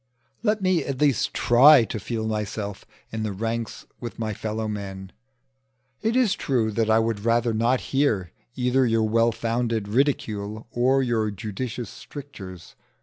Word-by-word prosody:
Let 210 -3 +1
me 185 -2 +2
at 135 -2 -4
least 145 -5 +2
try 130 +2 +7
to 110 - -4
feel 110 +2 -3
myself 105 -2 -4 0.3
in 110 - -3
the 110 -1 -2
ranks 115 +3 -4
with 120 -2 -7
my 110 -2 -2
fellow 110 +1 -3
men. 95 -2 -6 0.9
It 225 +2 0
is 250 -6 +4
true, 115 -5 0
that 110 +1 0
I 110 - +5
would 115 -2 0
rather 115 0 +2
not 120 +4 +2
hear 115 - +1 0.2
either 125 +1 +2
your 115 -1 +2
well 115 +1 +3
founded 115 -2 -1
ridicule 110 -4 -1
or 130 +3 +2
your 115 -3 +1
judicious 110 +2 -5
strictures. 95 - -10
115 Hz, 150 wpm, -25 LUFS, 110-130 Hz, 0.9 s, try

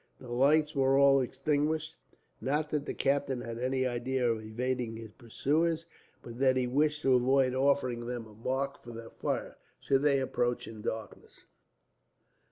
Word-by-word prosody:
The 125 -2 -10
lights 150 +5 +3
were 135 0 +3
all 140 -1 +6
extinguished, 150 +4 -1 0.5
not 150 +3 -1
that 150 -1 -2
the - - -2
captain 135 -2 0
had 115 0 -6
any 130 +1 0
idea 125 +1 -1
of 110 -1 -3
evading 120 +1 -3
his 115 -1 -9
pursuers, 155 +8 -1 0.4
but 120 0 -9
that 130 -1 +4
he 130 - +1
wished 150 +4 +1
to 135 - +4
avoid 130 +1 +3
offering 130 -3 +1
them 120 -2 -4
a 110 - -15
mark 130 +5 -3
for 120 - -10
their 115 0 -9
fire, - - -3 0.2
should 135 -1 +1
they 140 -2 +3
approach 120 -2 -1
in 110 - -9
the 105 - -2
darkness. 110 -3 -9
130 Hz, 170 wpm, -30 LUFS, 120-140 Hz, 0.5 s, all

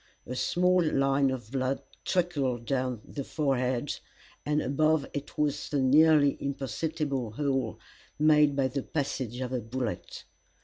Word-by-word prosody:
A 125 - -5
small 180 +6 +2
line 135 -2 +2
of 120 -4 -5
blood 135 0 0 0.3
trickled 140 -10 0
down 125 -4 -1
the 140 - -5
forehead, 130 -3 -1 0.4
and 150 0 +1
above 155 +2 +2
it 145 0 -6
was 145 -1 0
the 145 - 0
nearly 145 +2 +5
imperceptible 140 -2 -2
hole 135 0 -1 0.4
made 150 -1 +5
by 135 -2 +2
the 135 +2 -3
passage 130 -5 -3
of 130 0 -3
a 125 - 0
bullet. 115 -3 -4
140 Hz, 135 wpm, -29 LUFS, 130-150 Hz, 0.4 s, nearly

